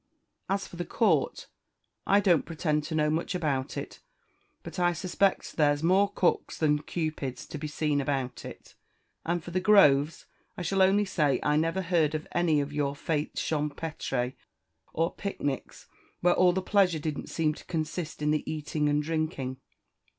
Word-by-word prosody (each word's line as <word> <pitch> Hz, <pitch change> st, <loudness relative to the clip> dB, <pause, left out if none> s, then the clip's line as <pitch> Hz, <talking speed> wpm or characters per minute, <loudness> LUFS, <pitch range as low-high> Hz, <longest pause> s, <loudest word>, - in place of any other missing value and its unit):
As 195 Hz, 0 st, 0 dB
for 175 Hz, -, -11 dB
the 175 Hz, -, -2 dB
court, 175 Hz, -, +1 dB, 0.6 s
I 200 Hz, -, +5 dB
don't 180 Hz, -5 st, +4 dB
pretend 155 Hz, -2 st, -1 dB
to 160 Hz, 0 st, -4 dB
know 150 Hz, -1 st, +2 dB
much 165 Hz, +4 st, -1 dB
about 140 Hz, -6 st, -1 dB
it; -, -, -6 dB, 0.6 s
but -, -, -7 dB
I 175 Hz, 0 st, +3 dB
suspect 185 Hz, +2 st, 0 dB
there's 145 Hz, -1 st, +3 dB
more 195 Hz, +4 st, +4 dB
cooks 180 Hz, -, 0 dB
than 150 Hz, -2 st, +2 dB
Cupids 155 Hz, -5 st, -4 dB
to 155 Hz, -, -7 dB
be 155 Hz, -, -4 dB
seen 145 Hz, -1 st, 0 dB
about 135 Hz, -3 st, -2 dB
it. -, -, -11 dB, 0.5 s
And 170 Hz, -1 st, 0 dB
for 175 Hz, -, -8 dB
the 185 Hz, -, +1 dB
groves, 165 Hz, -7 st, +4 dB, 0.3 s
I 180 Hz, -, -4 dB
shall 195 Hz, +3 st, +1 dB
only 195 Hz, +2 st, +4 dB
say 150 Hz, -9 st, +1 dB
I 150 Hz, -, +2 dB
never 165 Hz, +5 st, +1 dB
heard 165 Hz, -4 st, +2 dB
of 155 Hz, -, -4 dB
any 170 Hz, -4 st, +2 dB
of 140 Hz, +1 st, -5 dB
your 145 Hz, -1 st, -1 dB
fetes 150 Hz, 0 st, -2 dB
champétre, 150 Hz, -4 st, -2 dB, 0.6 s
or 165 Hz, +2 st, 0 dB
picnics, 145 Hz, -9 st, -4 dB, 0.4 s
where 175 Hz, 0 st, +4 dB
all 180 Hz, 0 st, +5 dB
the 190 Hz, +1 st, -2 dB
pleasure 190 Hz, -4 st, +3 dB
didn't 150 Hz, -1 st, -4 dB
seem 155 Hz, -2 st, 0 dB
to -, -, -13 dB
consist 160 Hz, -1 st, -4 dB
in 150 Hz, -, +2 dB
the 155 Hz, -, +1 dB
eating 150 Hz, -1 st, -1 dB
and 145 Hz, 0 st, +1 dB
drinking." 155 Hz, -5 st, -2 dB
155 Hz, 170 wpm, -28 LUFS, 150-175 Hz, 0.6 s, I